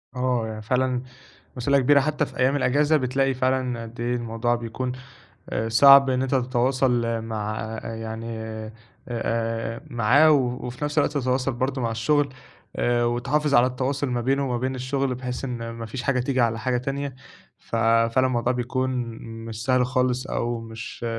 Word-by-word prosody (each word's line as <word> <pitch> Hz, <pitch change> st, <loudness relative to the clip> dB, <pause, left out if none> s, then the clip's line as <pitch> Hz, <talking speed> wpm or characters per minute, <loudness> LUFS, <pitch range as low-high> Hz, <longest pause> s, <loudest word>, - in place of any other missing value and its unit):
آه، 125 Hz, -2 st, 0 dB
هي 110 Hz, -, -5 dB
يعني 110 Hz, 0 st, -6 dB
فعلًا 125 Hz, +2 st, 0 dB, 0.6 s
مسئولية 140 Hz, +3 st, +3 dB
كبيرة 140 Hz, +2 st, +5 dB
حتى 150 Hz, +1 st, 0 dB
في -, -, -12 dB
أيّام 130 Hz, +2 st, +3 dB
الأجازة، 145 Hz, +3 st, +3 dB
بتلاقي 135 Hz, +1 st, +1 dB
فعلًا 130 Hz, -2 st, 0 dB
قد 115 Hz, +1 st, -10 dB
إيه 120 Hz, +1 st, 0 dB
الموضوع 120 Hz, 0 st, -1 dB
بيكون 120 Hz, +2 st, -4 dB, 0.6 s
أ 110 Hz, +1 st, -2 dB
صعب 135 Hz, +4 st, +8 dB
إن 130 Hz, 0 st, +1 dB
أنت 135 Hz, +1 st, 0 dB
تتواصل 125 Hz, -2 st, +1 dB
مع، 110 Hz, -1 st, -4 dB, 0.2 s
يعني 115 Hz, 0 st, -6 dB, 0.8 s
آآ، 115 Hz, -1 st, -2 dB
معاه 125 Hz, +7 st, +5 dB
و 145 Hz, -, +6 dB, 0.3 s
وفي 125 Hz, +4 st, -6 dB
نفس 150 Hz, +1 st, -4 dB
الوقت 145 Hz, -, +3 dB
تتواصل 130 Hz, 0 st, 0 dB
برضه 130 Hz, +2 st, -2 dB
مع 115 Hz, -1 st, 0 dB
الشغل 140 Hz, +5 st, +1 dB, 0.4 s
آآ 120 Hz, 0 st, +1 dB
وتحافظ 140 Hz, +5 st, 0 dB
على 120 Hz, +1 st, +6 dB
التواصُل 135 Hz, +3 st, -2 dB
ما 120 Hz, -1 st, -1 dB
بينه 135 Hz, +3 st, +1 dB
وما 120 Hz, -, 0 dB
بين 130 Hz, +2 st, -2 dB
الشغل، 130 Hz, +1 st, -1 dB
بحيث 125 Hz, +1 st, -4 dB
إن 120 Hz, -3 st, -4 dB
ما 115 Hz, 0 st, -6 dB
فيش 125 Hz, +3 st, -6 dB
حاجة 130 Hz, -1 st, +1 dB
تيجي 130 Hz, 0 st, 0 dB
على 115 Hz, -1 st, +1 dB
حاجة 125 Hz, +3 st, 0 dB
تانية، 135 Hz, +1 st, -3 dB, 0.4 s
ف -, -, -7 dB
فعلًا 115 Hz, +3 st, +3 dB
الموضوع 120 Hz, -1 st, 0 dB
بيكون 130 Hz, +1 st, -1 dB, 0.5 s
مش 110 Hz, -1 st, -6 dB
سهل 130 Hz, -1 st, +3 dB
خالص 125 Hz, 0 st, 0 dB
أو 120 Hz, 0 st, -2 dB
مش 115 Hz, +1 st, -8 dB
125 Hz, 170 wpm, -24 LUFS, 115-130 Hz, 0.8 s, صعب